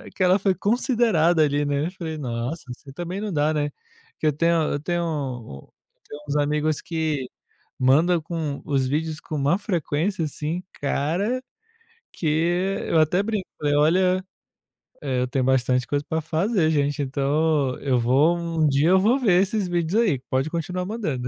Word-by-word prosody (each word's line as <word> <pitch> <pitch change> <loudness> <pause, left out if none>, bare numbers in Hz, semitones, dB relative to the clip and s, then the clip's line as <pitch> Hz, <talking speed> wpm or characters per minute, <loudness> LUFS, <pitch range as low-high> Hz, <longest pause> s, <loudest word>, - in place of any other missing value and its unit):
que 185 - 0
ela 185 +2 +4
foi 195 -1 +1
considerada 200 - +2
ali, 145 0 +1
né. 145 +1 0
Eu - - -6
falei: 165 -4 -6
"Nossa!", 125 +3 -4
assim 135 +2 -11
também 175 +6 -5
não 210 -2 -3
dá, 150 0 +1
né. 145 -1 0 0.5
Que 155 - 0
eu 150 - +3
tenho 170 +3 +2 0.2
eu 145 - -1
tenho 175 +3 -1
um 125 - -5 0.4
tenho 145 0 -9
uns 145 - -2
amigos 150 +1 0
que 155 -5 -2 0.5
manda 160 +7 +4
com 155 -3 -4
os 135 -3 0
vídeos 155 +2 -2
com 155 - -7
uma 145 +6 +2
frequência, 175 -2 -1
assim, 155 +4 -4 0.2
cara 175 - -1 0.7
que 165 - -5 0.6
eu 165 - +3
até 170 +5 +3
brinco, 210 -3 -2
falei: 145 -1 0
"Olha, 185 +5 +3 0.8
eh, 130 -3 -1
eu 125 - 0
tenho 130 0 -1
bastante 130 -1 +2
coisa 145 0 -1
para 160 0 -1
fazer 165 +2 +1
gente, 145 -1 0
então 140 0 0
eu 130 -3 +1
vou 140 +9 +3
um 165 -2 0
dia 145 +3 +3
eu 190 +1 +5
vou 235 +8 +3
ver 190 -7 +4
esses 200 0 0
vídeos 175 +4 +1
aí, 175 - +1
pode 135 +3 0
continuar 180 +2 -3
mandando." 170 - -3
155 Hz, 170 wpm, -24 LUFS, 145-180 Hz, 0.8 s, eu